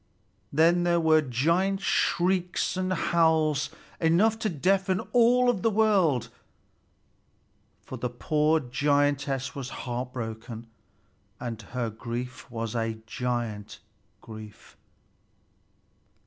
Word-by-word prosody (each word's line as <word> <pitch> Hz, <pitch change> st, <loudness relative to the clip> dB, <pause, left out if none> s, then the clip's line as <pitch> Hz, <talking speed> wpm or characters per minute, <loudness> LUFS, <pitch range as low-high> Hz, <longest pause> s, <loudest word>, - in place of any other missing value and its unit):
Then 165 Hz, +4 st, +4 dB
there 175 Hz, -1 st, +2 dB
were 160 Hz, -1 st, +4 dB
giant 165 Hz, +9 st, +1 dB
shrieks 180 Hz, 0 st, +1 dB
and 185 Hz, 0 st, -1 dB
howls 160 Hz, -4 st, +2 dB, 0.3 s
enough 195 Hz, +7 st, +3 dB
to 220 Hz, -, 0 dB
deafen 185 Hz, +4 st, +1 dB
all 245 Hz, +1 st, +5 dB
the 220 Hz, +1 st, 0 dB
world, 190 Hz, -, +2 dB, 1.5 s
for 130 Hz, -, -8 dB
the 125 Hz, -, -2 dB
poor 150 Hz, +5 st, +1 dB
giantess 140 Hz, 0 st, 0 dB
was 135 Hz, -2 st, -6 dB, 0.2 s
heartbroken, 120 Hz, -2 st, -5 dB, 0.7 s
and 115 Hz, -3 st, -5 dB
her 115 Hz, +2 st, -4 dB
grief 120 Hz, +4 st, -6 dB
was 115 Hz, -1 st, -4 dB
a 115 Hz, -1 st, -1 dB
giant 115 Hz, -2 st, -3 dB, 0.4 s
grief. 110 Hz, -2 st, -12 dB
145 Hz, 95 wpm, -27 LUFS, 120-175 Hz, 1.5 s, all